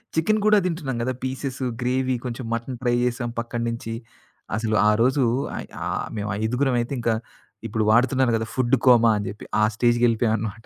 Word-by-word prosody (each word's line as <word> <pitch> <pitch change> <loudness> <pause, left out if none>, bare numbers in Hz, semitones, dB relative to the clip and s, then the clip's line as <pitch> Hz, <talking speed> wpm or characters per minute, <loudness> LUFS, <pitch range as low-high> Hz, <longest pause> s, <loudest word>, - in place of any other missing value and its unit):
Chicken 215 +7 +2
కూడా 210 0 +6
తింటున్నాం 155 -8 -2
గదా! 130 - -1
పీసెస్, 130 0 -4 0.2
గ్రేవీ 130 +1 0
కొంచెం 120 0 -5
మటన్ 120 +2 -4
ట్రై 120 0 +2
జేసాం 120 -1 -1
పక్కన్నించి. 115 -1 -3 0.6
అసలు 110 -1 -1
ఆ - - +6
రోజు 130 +2 +3 0.3
అయి - - -6 0.2
ఆ - - -3 0.3
మేం 105 0 -3
ఐదుగురమయితే 125 +2 0
ఇంకా 115 -1 +1 0.5
ఇప్పుడు 110 0 -1
వాడుతున్నారు 130 +2 +3
కదా! 110 - -3
ఫుడ్ 130 0 +3
కోమా 115 -2 +6
అని 100 - -3
చెప్పి 105 - -9 0.2
ఆ - - +4
స్టేజ్‌కి 120 +1 +2
వెళ్ళిపోయాం 115 -1 +1
అన్నమాట. 110 +1 -6
120 Hz, 170 wpm, -23 LUFS, 115-130 Hz, 0.6 s, కూడా